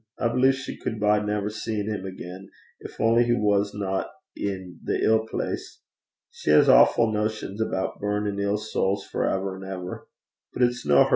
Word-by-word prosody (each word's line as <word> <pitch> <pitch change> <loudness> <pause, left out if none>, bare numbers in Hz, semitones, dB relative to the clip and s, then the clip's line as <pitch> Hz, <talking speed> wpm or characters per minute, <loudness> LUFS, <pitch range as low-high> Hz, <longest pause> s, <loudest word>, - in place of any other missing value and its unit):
I 120 - +1
believe 130 +3 +3
she 130 - -7
cud 110 - -4
bide 105 0 +2
never 105 0 -1
seein' 105 -1 -3
'im 100 -3 -3
again, 95 +1 -9 0.3
gin - - -7
only 115 +2 +4
he 120 0 +2
wasna 100 -2 +1
i' 95 0 -1 0.3
the 95 -3 -4
ill 110 0 +3
place. - - -4 0.5
She - - -5
has 75 - +6
awfu' 115 -2 +6
notions 105 -1 -2
aboot 95 -3 -2
burnin' 105 0 -1
ill 100 +1 +1
sowls 100 -2 -1
for - - -1
ever 95 0 -2
an' 95 - -9
ever. 90 -1 -6 0.5
But 125 - +1
it's 120 -8 0
no 70 -1 +7
hersel'. - - -2
105 Hz, 180 wpm, -25 LUFS, 95-110 Hz, 0.5 s, no